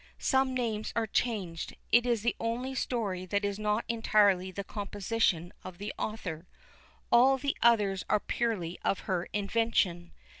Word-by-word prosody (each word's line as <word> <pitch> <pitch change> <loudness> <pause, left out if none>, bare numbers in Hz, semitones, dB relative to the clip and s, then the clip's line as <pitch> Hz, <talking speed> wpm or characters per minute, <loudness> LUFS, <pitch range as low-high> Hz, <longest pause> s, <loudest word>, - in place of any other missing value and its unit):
Some 265 -1 +1
names 220 -4 -2
are 230 - +1
changed. 205 -8 -2 0.2
It 240 +1 +5
is 235 -3 +1
the 240 - +1
only 240 +3 -2
story 205 -8 -2
that 200 +2 0
is 200 0 -2
not 210 +1 0
entirely 205 -5 +3
the 200 +2 -5
composition 200 -4 -1
of 185 -1 -9
the 205 +2 -5
author. 180 -6 -5 0.7
_All 265 +3 +6
the 280 +1 -1
others 205 -5 +3
are 210 - +3
purely 200 -8 -2
of 195 - 0
her 185 -2 -2
invention. 200 -4 0
210 Hz, 150 wpm, -30 LUFS, 190-235 Hz, 0.7 s, All